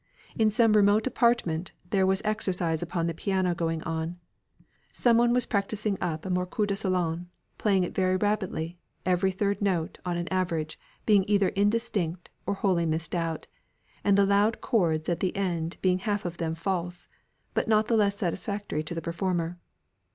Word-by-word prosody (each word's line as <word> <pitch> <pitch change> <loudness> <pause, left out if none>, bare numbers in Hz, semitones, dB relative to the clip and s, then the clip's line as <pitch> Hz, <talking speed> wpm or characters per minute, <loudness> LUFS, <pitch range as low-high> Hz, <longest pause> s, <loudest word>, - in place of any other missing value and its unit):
In 220 -1 +3
some 225 0 +4
remote 210 +1 +4
apartment, 235 -10 +1 0.2
there 190 -2 +3
was 190 +1 +2
exercise 180 -6 0
upon 175 -1 -2
the 165 - -1
piano 185 +1 0
going 165 -1 -2
on. 165 +1 -3 0.7
Someone 240 0 +3
was 250 0 +2
practising 205 0 -1
up 160 -2 -2
a 190 - -2
morceau 180 +4 0
de 200 -1 -1
salon, 180 -4 -1 0.3
playing 195 -4 +3
it 175 - -4
very 185 -1 +2
rapidly, 185 -4 -1 0.3
every 185 +1 +2
third 200 +2 -1
note, 180 -5 0
on 175 -1 -2
an 175 0 -3
average, 170 -4 -1 0.3
being 205 -3 +5
either 200 -2 +3
indistinct, 200 -5 0 0.2
or 200 - 0
wholly 185 -4 +1
missed 160 0 -1
out, 165 -2 -2 0.6
and 200 -1 +4
the 200 - +5
loud 205 +3 +3
chords 165 -8 +1
at 170 - 0
the 185 - -1
end 175 -4 -2
being 185 -1 +3
half 205 0 -2
of 175 -1 -4
them 165 -1 -2
false, 175 0 -3 0.5
but - - 0
not 215 -1 +3
the 235 - +2
less 200 -2 +2
satisfactory 200 -2 -2
to 155 +2 -5
the 165 - -3
performer. 175 0 -2
185 Hz, 170 wpm, -27 LUFS, 170-205 Hz, 0.7 s, being